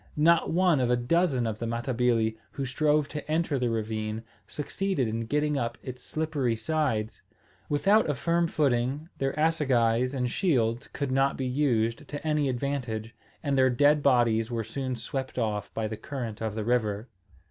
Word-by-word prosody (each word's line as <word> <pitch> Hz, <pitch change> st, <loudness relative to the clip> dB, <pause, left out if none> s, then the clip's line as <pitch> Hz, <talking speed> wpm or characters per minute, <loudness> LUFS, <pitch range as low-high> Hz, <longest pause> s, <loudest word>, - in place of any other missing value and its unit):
Not 165 Hz, +3 st, +4 dB
one 175 Hz, -3 st, +3 dB
of 125 Hz, -2 st, +1 dB
a 125 Hz, -, +4 dB
dozen 130 Hz, +1 st, +1 dB
of 110 Hz, -1 st, -3 dB
the 115 Hz, -, -2 dB
Matabili, 115 Hz, -1 st, +1 dB, 0.2 s
who 135 Hz, -, -3 dB
strove 150 Hz, +3 st, +2 dB
to 150 Hz, 0 st, -6 dB
enter 160 Hz, -3 st, +1 dB
the 125 Hz, -1 st, +1 dB
ravine, 110 Hz, 0 st, -2 dB, 0.2 s
succeeded 150 Hz, -2 st, -2 dB
in 115 Hz, +1 st, -3 dB
getting 150 Hz, +1 st, +1 dB
up 120 Hz, 0 st, -2 dB
its 125 Hz, -2 st, -7 dB
slippery 150 Hz, -7 st, -1 dB
sides. 115 Hz, -4 st, -1 dB, 0.5 s
Without 195 Hz, +7 st, +3 dB
a 145 Hz, -, +1 dB
firm 170 Hz, +5 st, +1 dB
footing 140 Hz, +1 st, 0 dB
their 135 Hz, 0 st, 0 dB
assegais 130 Hz, -6 st, +2 dB
and 125 Hz, -2 st, 0 dB
shields 120 Hz, -, +1 dB
could 140 Hz, -2 st, -3 dB
not 135 Hz, +1 st, +2 dB
be 130 Hz, -, -2 dB
used 125 Hz, -4 st, 0 dB
to 145 Hz, +2 st, -6 dB
any 150 Hz, -2 st, +2 dB
advantage; 120 Hz, -4 st, -3 dB, 0.3 s
and 140 Hz, -2 st, 0 dB
their 130 Hz, -1 st, +5 dB
dead 145 Hz, +4 st, +4 dB
bodies 120 Hz, -4 st, +3 dB
were 115 Hz, -2 st, -2 dB
soon 130 Hz, +2 st, -3 dB
swept 130 Hz, +4 st, -5 dB
off 105 Hz, -5 st, -1 dB
by 110 Hz, -1 st, -1 dB
the 110 Hz, 0 st, -5 dB
current 120 Hz, -6 st, -6 dB
of 110 Hz, -2 st, -2 dB
the 110 Hz, -1 st, -3 dB
river. 110 Hz, -2 st, 0 dB
130 Hz, 170 wpm, -28 LUFS, 115-150 Hz, 0.5 s, their